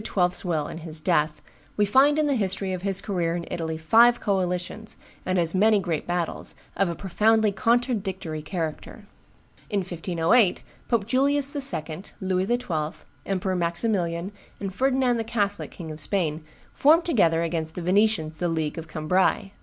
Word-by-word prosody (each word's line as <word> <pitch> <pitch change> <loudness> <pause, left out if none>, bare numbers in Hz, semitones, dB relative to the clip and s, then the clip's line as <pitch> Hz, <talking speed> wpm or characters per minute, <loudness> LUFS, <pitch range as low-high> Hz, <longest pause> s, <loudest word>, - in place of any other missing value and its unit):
's - - -8
will 160 -5 -1
and 160 - -7
his 160 -1 -7
death, 150 0 0 0.3
we 210 - +4
find 270 +8 +4
in 310 - +2
the 290 - +2
history 195 -4 -1
of 180 - -4
his 195 0 +1
career 175 -5 -1
in 170 -1 -4
Italy 160 -1 -3
five 230 +9 +5
coalitions, 190 +2 -2 0.3
and 185 0 +1
as 170 -2 +1
many 210 +3 +4
great 170 -5 -2
battles, 175 -1 -2 0.2
of 195 -2 +1
a 170 - -3
profoundly 215 +4 +2
contradictory 200 -8 -1
character. 160 -1 -5 0.6
In 205 -2 0
1508, 175 +4 +1 0.2
Pope 230 -5 +1
Julius 280 +4 +2
II., 180 - -1 0.2
Louis 185 -1 0
XII., 170 -10 -2 0.2
Emperor 190 -1 -1
Maximilian, 175 0 -1 0.3
and 195 -2 -4
Ferdinand 260 +1 +2
the 225 - -1
Catholic, 210 -3 -2
King 160 -3 -8
of 155 - -8
Spain, 160 -2 -1 0.3
form 320 +4 +5
together 170 - +2
against 160 -1 -3
the 180 - -5
Venetians 180 -4 +1
the 175 - 0
League 160 -1 -2
of 165 - -8
Cambrai. 180 +5 0
185 Hz, 160 wpm, -25 LUFS, 165-220 Hz, 0.6 s, five